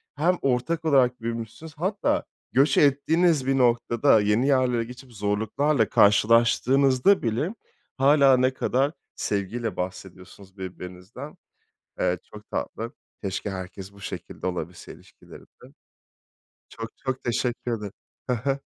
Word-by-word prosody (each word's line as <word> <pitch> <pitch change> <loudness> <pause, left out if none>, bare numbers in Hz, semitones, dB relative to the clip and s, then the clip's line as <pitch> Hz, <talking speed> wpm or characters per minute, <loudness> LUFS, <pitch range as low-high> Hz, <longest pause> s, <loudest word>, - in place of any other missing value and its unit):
hem 170 +5 +2
ortak 140 +6 0
olarak 125 -5 +3
büyümüşsünüz. 115 +7 -6
Hatta 195 +5 0 0.3
göç 135 +1 +3
ettiğiniz 150 +1 +3
bir 135 0 +2
noktada, 120 -1 +3
yeni 105 +6 +2
yerlere 130 -4 +2
geçip 125 +2 -12
zorluklarla 110 +5 0
karşılaştığınızda 125 - +4
bile 125 - -1 0.4
hâlâ 135 -1 +5
ne 130 +1 +2
kadar 135 +2 0 0.2
sevgiyle 105 +1 -2
bahsediyorsunuz 95 +1 -8
birbirinizden. 95 +8 -9 0.6
Eee, - - +1
çok - - -14
tatlı. - - -4 0.3
Keşke 100 +1 -3
herkes 95 0 -7
bu 100 - -16
şekilde 90 -1 -6
olabilse 90 -1 -5
ilişkilerinde. - - -17 1.0
Çok, 115 0 -7
çok 130 -1 -4
teşekkür 120 0 -1
ederim. 105 -2 -7 0.4
Hı - - +3
hı. 135 +3 -1
120 Hz, 115 wpm, -25 LUFS, 105-140 Hz, 1.0 s, hâlâ